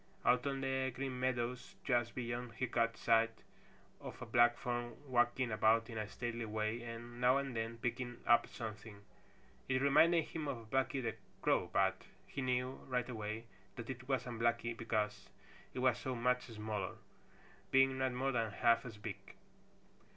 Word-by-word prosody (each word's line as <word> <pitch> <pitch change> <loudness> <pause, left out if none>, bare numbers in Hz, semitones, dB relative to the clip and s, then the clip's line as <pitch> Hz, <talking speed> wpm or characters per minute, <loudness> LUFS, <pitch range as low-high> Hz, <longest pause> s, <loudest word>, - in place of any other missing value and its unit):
Out 125 +2 +4
on 135 -1 -1
the 130 0 0
Green 130 0 -4
Meadows 125 -1 -1
just 120 -3 +1
beyond 120 -1 -3
he 130 - -1
caught 115 -2 +1
sight 115 0 +2 0.6
of - - -8
a - - -6
black 120 0 +5
form 120 -1 -3
walking 120 -1 +2
about 110 +2 +3
in 110 - -3
a 105 - -2
stately 120 +1 -4
way 110 +2 -1
and 120 +1 -7
now 125 +2 +5
and 135 -3 -2
then 115 +1 -2
picking 120 +1 -3
up 120 0 +5
something. 110 -2 -7 0.7
It 130 0 +3
reminded 160 +4 +5
him 155 -3 -4
of 115 -5 -5
Blacky 135 0 +1
the - - -1 0.3
Crow, - - +2
but - - +2 0.2
he 140 - -5
knew 125 0 0
right 125 -1 0
away 110 -1 -4 0.3
that 120 +1 -5
it 130 0 -9
wasn't 125 -3 -1
Blacky, 115 0 +1
because 105 -3 -2 0.5
it - - -5
was 125 -3 +3
so 130 -1 -3
much 125 +1 +1
smaller, 105 -4 -4 0.7
being 135 0 +4
not 130 -1 +2
more 130 +2 0
than 115 -3 0
half 115 +3 +3
as 110 -3 -9
big. 105 - -5
120 Hz, 165 wpm, -36 LUFS, 115-130 Hz, 0.7 s, black